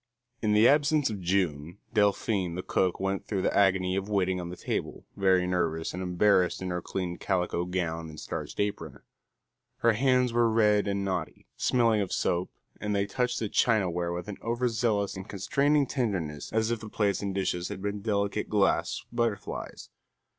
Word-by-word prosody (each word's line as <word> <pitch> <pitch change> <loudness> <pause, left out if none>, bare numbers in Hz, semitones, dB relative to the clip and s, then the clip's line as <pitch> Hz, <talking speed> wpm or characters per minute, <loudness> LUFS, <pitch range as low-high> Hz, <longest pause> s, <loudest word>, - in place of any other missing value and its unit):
In 105 -1 +2
the 105 +3 +6
absence 145 -2 +3
of 100 -3 -5
June, 85 -3 -1 0.2
Delphine 100 -4 +1
the 90 - -4
cook 90 -2 0
went 95 0 -2
through 95 -3 -1
the - - 0
agony 95 -2 +3
of 95 +1 -2
waiting 95 -3 +1
on 85 - -6
the 90 - -6
table, - - -4
very 95 -2 +3
nervous 85 -3 -1
and 90 - -4
embarrassed 90 0 +2
in 95 -1 -4
her 90 0 -2
clean 90 -1 -4
calico 90 -2 0
gown 85 -3 -3
and 75 -1 -10
starched - - -6
apron. 100 -8 -3 0.8
Her 115 -1 +4
hands 125 +1 +2
were 120 -1 +3
red 105 -2 +3
and 100 0 -1
knotty, 95 -1 -3
smelling 115 -4 +2
of 95 - -3
soap, 90 +1 0 0.3
and 105 -1 -2
they 100 0 +1
touched 125 +5 -1
the 110 - -1
chinaware 90 -7 +1
with 90 +3 -5
an 105 - -6
over 120 +2 0
zealous 110 -4 0
and 95 +2 -8
constraining 140 +8 +2
tenderness 95 - -2
as 110 +1 +1
if 120 - -1
the 110 - -9
plates 100 -2 0
and 100 -2 -3
dishes 90 -2 -1
had 100 -2 -6
been 100 0 -3
delicate 100 0 -1
glass 105 -2 +1
butterflies. 110 -4 -3
100 Hz, 180 wpm, -28 LUFS, 90-110 Hz, 0.8 s, the